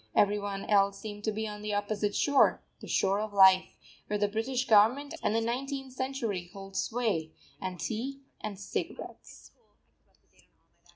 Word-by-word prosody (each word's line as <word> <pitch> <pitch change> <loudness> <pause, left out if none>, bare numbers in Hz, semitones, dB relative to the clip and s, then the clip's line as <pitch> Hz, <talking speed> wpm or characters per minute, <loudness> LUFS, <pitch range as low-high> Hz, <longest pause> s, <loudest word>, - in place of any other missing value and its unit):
Every 205 0 +4
one 200 -1 -4
else 200 -1 +3
seemed 205 0 -8
to 220 - +1
be 220 +1 -3
on 210 0 -7
the 210 -1 -2
opposite 205 0 -1
shore 285 -2 +3 0.2
the - - -10
shore 195 +1 +2
of 215 -1 -4
life 190 -1 +6 0.3
where 210 - 0
the 205 0 +2
British 245 +5 -1
Government 245 +8 +4
and 215 - +1
the 225 - +2
Nineteenth 265 +3 -3
Century 235 -9 -3
hold 195 -1 -10
sway, 200 -11 -1 0.3
and 185 -2 -4
tea 265 +5 -3 0.2
and 205 -3 -5
cigarettes. 205 - -6
210 Hz, 155 wpm, -30 LUFS, 200-240 Hz, 0.3 s, life